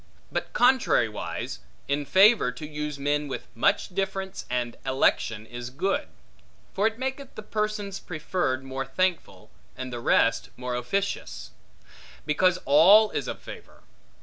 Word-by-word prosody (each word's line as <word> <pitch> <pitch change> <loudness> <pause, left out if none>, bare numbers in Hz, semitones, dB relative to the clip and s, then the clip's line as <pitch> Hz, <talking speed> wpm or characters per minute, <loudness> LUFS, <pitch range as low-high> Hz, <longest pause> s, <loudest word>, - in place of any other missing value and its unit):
But - - -3
contrariwise, 230 - +1 0.3
in 145 +1 -1
favor, 195 - +5
to 140 +4 -8
use 150 -1 -4
men 145 +1 0
with 135 - -5
much 115 - +1
difference 195 0 -3
and 120 -1 -2
election 125 -4 +1
is 120 +1 -7
good; 195 - -1 0.7
for 205 +3 +2
it 225 0 -3
maketh 265 +1 -5
the 215 - -7
persons 210 -2 -3
preferred 155 -5 -2
more 135 0 -4
thankful, 135 - -2 0.3
and 130 -1 -5
the 120 - -4
rest 115 -1 +2
more 125 0 -4
officious: 125 - -3 0.7
because 175 +4 +3
all 195 +9 +7
is - - -3
of - - -5
favor. - - -12
150 Hz, 135 wpm, -26 LUFS, 125-200 Hz, 0.7 s, all